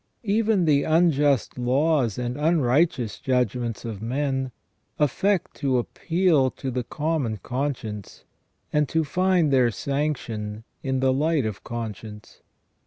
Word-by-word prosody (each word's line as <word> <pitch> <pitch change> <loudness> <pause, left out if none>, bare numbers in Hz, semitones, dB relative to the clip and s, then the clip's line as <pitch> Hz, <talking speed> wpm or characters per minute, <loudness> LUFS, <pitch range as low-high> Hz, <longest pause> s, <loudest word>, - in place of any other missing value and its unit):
Even 210 -3 +2
the 145 -3 +4
unjust 145 -6 +2
laws 130 -1 +2
and 125 0 -2
unrighteous 150 -4 +1
judgments 125 -2 -1
of 110 -4 -5
men 135 +2 -1 0.5
affect 175 +6 +1
to 135 -3 +1
appeal 160 +2 +1
to 130 +1 -5
the 125 0 -2
common 145 -3 -2
conscience, 120 -4 -4 0.5
and 150 -2 +2
to 160 0 +1
find 175 -1 +2
their 125 -3 +4
sanction 115 -5 -3 0.2
in 130 -1 -1
the 130 0 +3
light 150 -1 +1
of 105 -3 -4
conscience. 110 -2 -7
135 Hz, 120 wpm, -24 LUFS, 120-155 Hz, 0.5 s, the